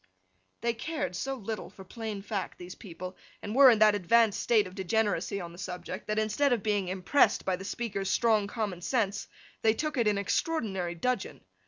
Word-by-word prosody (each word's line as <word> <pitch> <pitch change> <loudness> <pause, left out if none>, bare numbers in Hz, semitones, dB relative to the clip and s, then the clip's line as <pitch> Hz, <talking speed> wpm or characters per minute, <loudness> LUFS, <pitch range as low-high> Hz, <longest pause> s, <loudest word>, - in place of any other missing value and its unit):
They 235 +1 +1
cared 295 - -3
so 270 +10 -2
little 220 -5 -5
for 190 0 -13
plain 215 0 -6
Fact, 200 -3 -4
these 180 0 -8
people, 185 -1 -8 0.3
and 205 - -4
were 270 +1 +9
in 230 - +5
that 215 0 +6
advanced 205 +3 +3
state 220 -4 +3
of 185 - -9
degeneracy 200 +1 0
on 170 -2 -6
the 175 - -13
subject, 185 +2 -6
that 215 0 -1
instead 220 +6 +2
of 235 -5 +1
being 205 -3 0
impressed 190 +9 +2
by 190 - +1
the 190 +2 -9
speaker's 200 -3 -3
strong 220 -3 +3
common 205 -5 -3
sense, 205 -1 -1 0.3
they 220 0 +3
took 305 +3 -2
it 235 -3 +2
in 210 -1 +2
extraordinary 200 - -1
dudgeon. 250 +9 -2
210 Hz, 190 wpm, -29 LUFS, 190-230 Hz, 0.3 s, were